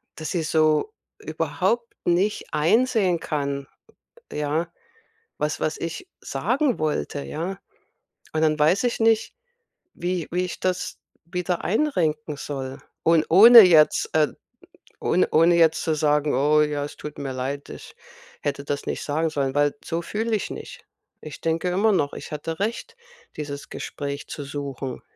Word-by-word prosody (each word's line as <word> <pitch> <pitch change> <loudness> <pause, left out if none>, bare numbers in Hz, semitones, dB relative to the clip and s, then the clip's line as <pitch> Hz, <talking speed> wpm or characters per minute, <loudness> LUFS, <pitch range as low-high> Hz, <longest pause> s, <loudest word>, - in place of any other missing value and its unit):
dass 155 -1 -5
sie 170 -3 -1
so 155 - +2 0.3
überhaupt 235 0 -1
nicht 185 +4 +1
einsehen 190 +2 +2
kann, 140 -3 -3 0.7
ja, 150 +3 -2 0.7
was 150 +1 -2
was 155 - -1
ich 170 - -6
sagen 285 -6 0
wollte, 150 -2 -2
ja. 185 +5 -5 0.7
Ond 155 0 +1
dann 155 -1 +2
weiß 175 +10 +3
ich 240 - -1
nicht, 225 0 +2 0.6
wie 175 -1 -3
wie 180 +1 0
ich 180 - -7
das 185 -1 -2 0.3
wieder 180 +1 -2
einrenken 160 - 0
soll. 135 -2 -5 0.2
Und 165 -1 +4
ohne 230 +7 +10
jetzt, 165 -6 +5
äh 155 -1 +4 0.7
ohne - - +2
ohne 170 +2 +5
jetzt 165 -2 +4
zu 160 - 0
sagen: 150 -1 +1
„Oh 150 +3 +4
ja, 145 -1 -1
es 145 - -8
tut 150 - -8
mir 135 -2 -4
leid, 135 +2 -4
ich - - -10 0.5
hätte 140 -1 -3
das 145 0 -3
nicht - - -3
sagen 155 +2 0
sollen“, 140 -3 -1
weil 145 0 +2
so 165 - -2
fühle 220 +5 -2
ich 205 - -4
nicht. - - -9 0.3
Ich 155 -2 -9
denke 165 +2 0
immer 205 +4 +3
noch, 145 -7 0
ich - - -9
hatte 160 +3 -5
recht, 235 - -3 0.4
dieses 145 -1 -6
Gespräch 140 0 -6
zu 145 - -6
suchen. 140 -2 -5
160 Hz, 150 wpm, -24 LUFS, 145-180 Hz, 0.7 s, ohne